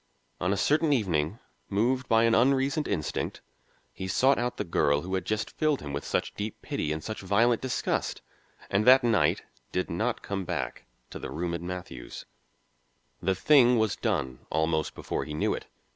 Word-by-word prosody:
On 90 - 0
a 100 - +1
certain 155 +5 +2
evening, 95 - +1 0.3
moved 120 +5 +1
by 115 0 +5
an 115 0 +4
unreasoned 135 +5 +2
instinct, 80 -7 -2 0.5
he 95 - -5
sought 130 +8 +3
out 120 0 -2
the - - -1
girl 70 -4 +2
who 95 +4 -6
had 95 - -1
just 110 0 -2
filled 155 -3 +1
him 70 -1 -7
with 70 - -3
such - - -1
deep 105 +1 -5
pity 75 - -2
and 80 0 -3
such 110 - -5
violent 110 +5 +2
disgust, 130 -1 -2 0.5
and 100 +2 +2
that 130 +1 +8
night 115 -2 +2 0.3
did 90 - -2
not 110 +8 -1
come 100 -1 -3
back - - -4 0.2
to - - -7
the - - -6
room 85 +1 -3
in 85 +1 -4
Matthew's. 90 -9 -7 1.0
The 95 +2 +1
thing 125 +2 +5
was 110 -2 +1
done 65 -1 -2
almost 80 0 0
before - - -3
he 75 - -6
knew 75 - +1
it. - - -6
100 Hz, 180 wpm, -28 LUFS, 85-125 Hz, 1.0 s, that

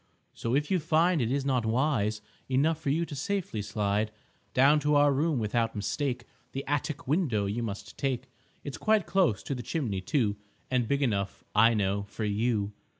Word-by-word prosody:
So 115 +2 -1
if 150 +4 0
you 185 - +3
find 165 +1 +3
it 115 0 0
is 140 0 0
not 130 -4 +1
wise 110 -3 +1 0.3
Enough 150 +5 +2
for 145 - -1
you 165 +4 +1
to 150 - -7
safely 165 - -2
slide 105 0 0 0.5
Down 140 +4 +6
to 150 0 +2
our 145 0 +5
room 150 +2 +1
without 115 +1 0
mistake, 125 +4 -2 0.3
The 135 - -4
attic 145 +2 -2
window 135 - +1
you 105 +4 -2
must 100 -4 -6
take. 135 -2 -1 0.4
It's 140 - -6
quite 215 -4 +3
close 175 - +2
to - - -3
the 125 - -4
chimney, 120 - -2
too, 105 -1 0 0.3
And 125 -3 +1
big 140 +3 +1
enough, 100 -6 -1
I 115 +2 +5
know, 100 -1 +1
for 110 - -4
you. 105 0 0
130 Hz, 185 wpm, -29 LUFS, 110-150 Hz, 0.5 s, Down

